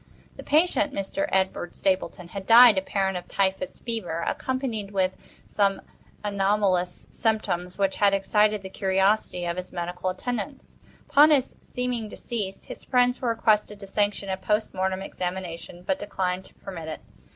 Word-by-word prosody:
The - - -9
patient, 300 -2 +2
Mr. 280 +10 -2
Edward 190 -2 0
Stapleton, 185 -2 -1
had 195 0 -7
died, 230 -3 +9
apparently 190 -1 -1
of - - -15
typhus 195 +7 -1
fever, 185 -8 -3
accompanied 255 -6 -2
with 190 -2 0 0.3
some 200 -1 +1 0.4
anomalous 195 -3 +1
symptoms 185 -6 -1
which 195 -1 +1
had 205 -1 +4
excited 210 +1 +2
the 190 - -6
curiosity 190 -1 +1
of 170 +1 -2
his 185 0 -5
medical 180 +1 -3
attendants. 245 +7 -5 0.3
Upon 295 +2 +7
his 275 -4 +2
seeming 250 -3 -3
decease, 205 -4 -5
his - - -9
friends 250 -1 +2
were 245 - 0
requested 210 -2 +1
to 200 - -8
sanction 205 0 -1
a 190 - -1
post 210 +2 0
mortem 190 0 -1
examination, 180 -2 -5
but 190 +1 -1
declined 190 -2 -2
to - - -17
permit 175 -5 -8
it. 155 - -6
195 Hz, 150 wpm, -26 LUFS, 185-225 Hz, 0.4 s, died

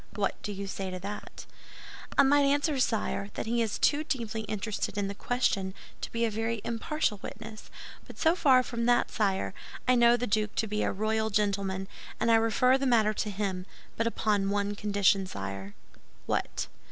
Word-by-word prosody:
What 200 -1 -1
do 210 - -4
you 200 0 -5
say 190 0 -4
to 185 - -4
that?" 200 +3 -7 0.7
"I - - +8
might 285 +1 +5
answer, 285 +1 +2
sire, 215 -4 0
that - - -3
he 235 +1 +1
is 225 -2 -1
too 295 +1 +3
deeply 230 -7 -2
interested 210 0 -3
in 200 -1 0
the 200 - -4
question 200 -4 0 0.3
to - - -5
be 230 0 +1
a 225 - -1
very 225 +1 -1
impartial 235 -1 -1
witness; 220 +1 -9 0.4
but - - -11
so 325 +1 +3
far 260 -7 +5
from 235 -1 -2
that, 240 0 +3
sire, 190 - 0 0.3
I 255 - +6
know 240 -1 +5
the 245 - -1
duke 215 -1 0
to 225 - +1
be 210 0 -2
a - - +1
royal 220 +2 0
gentleman, 200 -2 0 0.3
and 230 +1 +2
I - - +7
refer 250 +4 +3
the 275 - 0
matter 220 -3 +4
to 210 - -2
him—but 195 +2 -4
upon 205 -3 +1
one 205 0 0
condition, 200 -2 +2
sire." 100 - -6 0.5
"What?" - - -1
215 Hz, 185 wpm, -29 LUFS, 200-235 Hz, 0.7 s, I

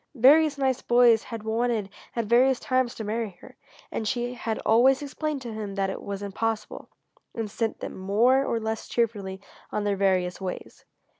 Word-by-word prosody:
Various 290 +4 +5
nice 265 -2 0
boys 240 -2 +5
had 230 -2 -7
wanted 225 -1 0 0.3
at 235 -2 -1
various 250 +4 +4
times 255 -2 0
to 220 - -5
marry 215 -3 -3
her, - - -14 0.4
and 220 - -3
she 245 +2 -1
had 230 -2 -3
always 260 +5 +4
explained 290 -1 -3
to 235 - -6
them 210 -2 -5
that 195 -1 0
it - - -6
was 200 0 -5
impossible, 215 +2 -3 0.5
and 225 -3 -3
sent 225 +1 -2
them, - - -5
more 230 +8 +3
or 235 - -1
less 220 0 -4
cheerfully, 205 -5 -1 0.3
on 210 - -1
their 205 -1 +1
various 185 -2 +1
ways. 185 -1 -7
225 Hz, 175 wpm, -26 LUFS, 205-245 Hz, 0.5 s, Various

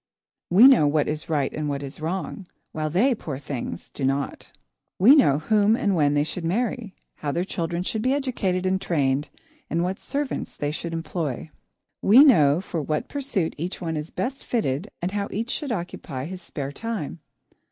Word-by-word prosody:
We 195 +8 +7
know 250 - +6
what 150 0 +2
is 150 0 -4
right 145 -4 0
and 150 -1 -2
what 140 0 -3
is 140 +3 -8
wrong, 180 +3 -4 0.2
while 155 -1 -2
they, 215 - +3
poor 155 - -5
things! 140 -3 -6
do 140 - -6
not. 135 +1 -2 0.5
We 235 +10 +8
know 145 - +5
whom 210 +7 +3
and 200 -4 +1
when 145 -3 +3
they 145 - +3
should 165 +3 -4
marry, 220 +3 -1 0.2
how 145 - -2
their 170 +5 0
children 170 -2 -2
should 215 +3 -2
be 255 +3 +1
educated 200 -10 -1
and 190 0 +1
trained, 140 -3 0 0.4
and 170 +1 0
what 185 +2 -2
servants 285 -1 -3
they 145 0 -2
should 165 +2 -5
employ. 160 -3 -3 0.5
We 235 +8 +8
know 160 - +5
for 170 -4 -3
what 150 +1 -2
pursuit 265 - -1
each 175 +4 -4
one 165 -3 -3
is 150 +1 -4
best 265 +2 -4
fitted 200 - -1
and 180 - 0
how 200 0 -2
each 230 +4 -3
should 290 -4 -3
occupy 170 - -4
his 185 +2 -7
spare 140 -5 -5
time. 210 -3 -4
170 Hz, 185 wpm, -24 LUFS, 150-210 Hz, 0.5 s, We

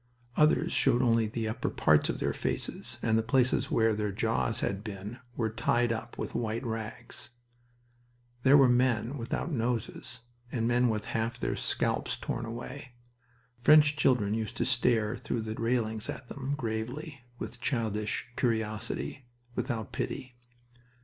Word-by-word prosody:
Others 155 0 +4
showed 120 - +3
only 115 -2 +3
the 110 +1 -2
upper 115 +3 -2
parts - - +3
of - - -1
their - - 0
faces, - - -2
and 110 0 +3
the - - +3
places 125 +2 +2
where 115 -1 +3
their 105 -1 -1
jaws 115 +2 0
had 100 +1 -1
been 105 +2 -6 0.2
were 110 -2 0
tied 120 +1 +2
up 115 0 -6
with - - -4
white 115 +1 -2
rags. 115 +1 -5 1.1
There 135 +3 +7
were 135 -2 +7
men 125 0 +2
without 120 +8 -2
noses, 125 0 -2 0.3
and 115 -3 0
men 120 0 +3
with 110 -1 -1
half 115 +2 -2
their - - -1
scalps - - 0
torn 115 - -3
away. 125 +3 -7 0.7
French 150 +3 +7
children 125 -8 +3
used 110 +1 -3
to - - +1
stare 120 -3 +2
through 120 -1 -2
the 110 0 -4
railings 110 -2 -1
at 125 - -6
them, 140 +1 -3
gravely, 125 +5 -4 0.2
with - - -7
childish 110 -4 -1
curiosity, 115 +2 -2 0.3
without 115 -5 -2
pity. 125 -1 -4
115 Hz, 150 wpm, -30 LUFS, 110-125 Hz, 1.1 s, There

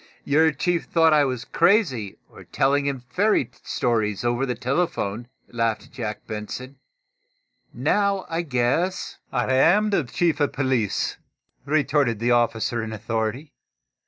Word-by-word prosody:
"Your 160 +3 +3
chief 175 +1 -1
thought 165 -2 +3
I 150 -1 +5
was 125 -3 -3
crazy, 165 - +2
or - - -14
telling 140 +1 +1
him 135 -3 -3
fairy 190 - +2
stories 110 -3 -1
over 120 +3 0
the 125 - -1
telephone," 125 - -2 0.2
laughed 115 -2 -1
Captain - - -19
Jack 110 -5 -5
Benson. 125 +5 -6 0.9
"Now, 195 - 0
I 165 +1 -1
guess 145 +5 -1
" - - -42
"I 130 0 0
am 205 +11 +4
the 195 - +2
Chief 155 +5 0
of 145 -2 +1
police," 130 -7 0 0.5
retorted 145 -5 +1
the 120 +3 0
officer 120 -1 +1
in 110 0 -5
authority. 110 +6 -3
130 Hz, 140 wpm, -24 LUFS, 115-160 Hz, 0.9 s, I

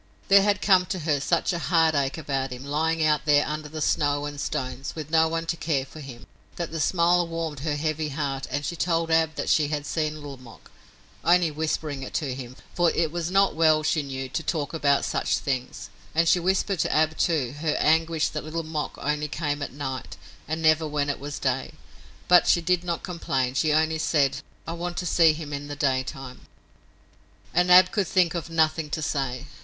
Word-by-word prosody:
There 200 0 +8
had 205 0 +1
come 185 -2 +4
to 185 -4 -3
her 150 -2 +1
such 170 +5 0
a 170 - -2
heartache 155 -2 +2
about 135 -4 -3
him, 125 +2 -7
lying 160 +2 0
out 150 -1 +1
there 145 -1 +4
under 150 0 -5
the 155 +1 -6
snow 145 -1 +1
and 145 -1 -5
stones, 130 +1 -4
with 155 -1 -7
no 160 0 +4
one 165 +1 -2
to 165 - -1
care 150 -5 -1
for 155 - -12
him, 135 -5 -10 0.3
that 170 -2 -4
the 165 - -4
smile 175 +1 +2
warmed 165 -3 -4
her 150 +1 -2
heavy 155 +1 -2
heart 135 -2 -3
and 145 +2 -3
she 170 - -3
told 165 -1 0
Ab 160 -1 +2
that - - -4
she 150 -2 +3
had 145 -1 -3
seen 155 0 -2
Little 145 -3 -8
Mok, 125 -3 -16 0.5
only 175 -2 +4
whispering 150 -2 -3
it 130 - -7
to 140 -5 -1
him 130 -1 -8 0.2
for 175 -2 +3
it 160 -1 0
was 170 0 -3
not 195 +1 +3
well, 155 -1 +3
she 155 0 +1
knew, 135 -2 -5
to 135 +5 -3
talk 155 -3 -2
about 140 -3 +2
such - - 0
things 125 -6 -4 0.2
and 165 +1 +3
she 175 - +4
whispered 190 +1 0
to - - +1
Ab, 155 +1 +2
too, 150 -9 0
her 155 -1 0
anguish 160 0 +2
that 150 - -5
Little 160 +2 -4
Mok 155 -1 -4
only 150 +1 -1
came 145 -1 -3
at 145 - -4
night, 135 -2 -6 0.3
and 160 +1 -3
never 155 0 +4
when 145 -1 -1
it - - -6
was 145 +1 -6
day, 130 -2 -2 0.5
but 180 0 +6
she - - +5
did 180 +1 0
not 170 -2 -3
complain. 135 -8 -2
She 155 +3 +1
only 160 +1 +2
said: 140 -4 +1 0.3
"I 165 - -4
want 175 +1 -5
to 180 - -2
see 165 -2 +4
him 150 -1 -7
in 145 0 -5
the 145 - -6
daytime." 135 -1 -3 1.1
And 180 +1 +3
Ab 180 0 +8
could 205 -4 0
think 180 -3 +2
of 170 -2 -4
nothing 160 -1 +1
to 155 +1 -3
say. 135 -3 -2
155 Hz, 210 wpm, -25 LUFS, 145-165 Hz, 1.1 s, There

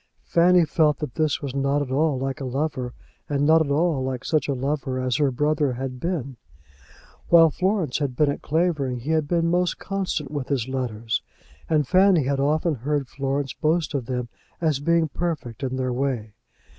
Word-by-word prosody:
Fanny 175 0 +4
felt 150 -1 +2
that 150 -6 -5
this 155 0 0
was 135 -3 -4
not 140 +1 +1
at 130 - -7
all 145 +1 +2
like 135 +3 -3
a - - -3
lover, 130 -1 -2 0.3
and 145 0 +1
not 160 +1 +5
at 145 - -5
all 150 -1 +1
like 130 -1 -4
such 155 -4 +1
a 140 - 0
lover 135 0 -2
as 130 -1 0
her 145 -2 +3
brother 145 +1 +1
had 130 0 -5
been. 140 -6 -3 0.9
While 165 -2 +7
Florence 185 -5 0
had 140 -4 -2
been 145 +1 +3
at - - -6
Clavering 150 -6 0
he 145 +6 -3
had 155 -2 +1
been 170 +1 +1
most 180 +1 +1
constant 190 -8 -3
with 145 -4 -3
his 130 -4 -1
letters, 115 -4 -2 0.5
and 150 -4 +2
Fanny 185 -2 +5
had 135 +1 0
often 155 +4 +1
heard 140 +1 -2
Florence 135 -1 -2
boast 160 0 0
of 130 -5 -2
them 125 -2 -2 0.3
as 155 -5 +1
being 165 +2 +2
perfect 150 -7 -4
in 130 -1 -2
their 130 -1 -1
way. 120 -5 -2
145 Hz, 190 wpm, -24 LUFS, 130-160 Hz, 0.9 s, While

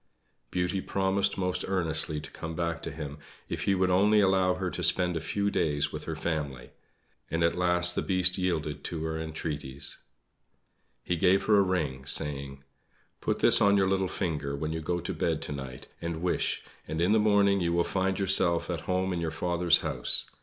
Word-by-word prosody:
Beauty 90 +1 -1
promised 95 +1 0
most 90 -1 -1
earnestly 80 -5 0
to - - -10
come 80 0 -7
back 85 -1 -2
to - - -5
him 75 -1 -7 0.3
if - - -3
he 100 - +3
would 95 0 +1
only 105 +4 +4
allow 95 -2 +3
her 95 -1 -3
to - - -5
spend 90 -2 +3
a - - -1
few 100 +5 -1
days 75 -2 0
with - - -6
her - - -4
family; 70 -7 -4 0.6
and 85 +1 0
at 85 - +2
last 90 0 +4
the - - -1
Beast 90 -1 +2
yielded 80 -5 -2
to 80 -2 -4
her 80 0 -3
entreaties. 75 -4 -5 1.0
He 90 - -1
gave 95 +3 +3
her 105 -2 +4
a - - +6
ring, 75 -9 -2
saying: 70 -1 0 0.6
"Put - - -2
this - - +7
on 100 0 +5
your 95 -1 +3
little 95 0 +1
finger 75 -6 -3
when 80 +2 -3
you 80 - -4
go 85 +3 -1
to 90 +3 -4
bed 80 -1 -1
to - - -4
night, 65 -3 -7 0.2
and 85 0 -4
wish; 90 - 0 0.2
and 80 +1 -4
in 90 +4 +2
the 110 - +4
morning 100 -2 +3
you 85 -1 0
will 85 0 +2
find 95 +1 -1
yourself 90 -3 +2
at 85 -3 -3
home 95 0 0
in 85 - -2
your 85 - -1
father's 85 +1 +2
house. 70 -6 -1
85 Hz, 195 wpm, -28 LUFS, 80-95 Hz, 1.0 s, this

